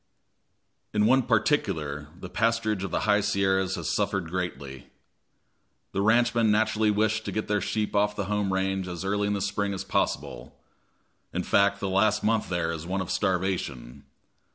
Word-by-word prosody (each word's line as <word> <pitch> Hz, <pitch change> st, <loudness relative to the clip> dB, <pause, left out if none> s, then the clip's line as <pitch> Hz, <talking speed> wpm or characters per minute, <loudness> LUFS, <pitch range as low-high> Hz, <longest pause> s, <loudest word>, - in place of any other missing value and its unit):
In 105 Hz, 0 st, +3 dB
one 130 Hz, +4 st, +5 dB
particular 100 Hz, -, 0 dB
the -, -, -7 dB
pasturage 115 Hz, -1 st, 0 dB
of 95 Hz, -, -3 dB
the -, -, -1 dB
high 105 Hz, 0 st, +3 dB
Sierras 95 Hz, -2 st, +1 dB
has -, -, -3 dB
greatly 90 Hz, -8 st, -2 dB
suffered. -, -, -21 dB, 1.0 s
The 100 Hz, -, -1 dB
ranchmen 115 Hz, +1 st, +3 dB
naturally 110 Hz, 0 st, +2 dB
wish 110 Hz, +1 st, +1 dB
to -, -, -5 dB
get 110 Hz, -, -3 dB
their 105 Hz, -1 st, +1 dB
sheep 105 Hz, +3 st, -2 dB
off 105 Hz, 0 st, +2 dB
the 100 Hz, -, -2 dB
home 105 Hz, -1 st, -1 dB
range 95 Hz, 0 st, -1 dB
as 90 Hz, +1 st, -5 dB
early 100 Hz, +1 st, 0 dB
in 105 Hz, -, 0 dB
the 100 Hz, -, -2 dB
spring 100 Hz, 0 st, -1 dB
as -, -, -4 dB
possible -, -, -2 dB, 0.7 s
in -, -, -2 dB
fact, 100 Hz, 0 st, +3 dB
the 100 Hz, -, -2 dB
last 105 Hz, +3 st, +2 dB
month 110 Hz, 0 st, +1 dB
there 85 Hz, -2 st, -1 dB
is 80 Hz, 0 st, -6 dB
one 95 Hz, +2 st, -1 dB
of 95 Hz, -, -4 dB
starvation. 90 Hz, -, -2 dB
100 Hz, 170 wpm, -27 LUFS, 95-105 Hz, 1.0 s, one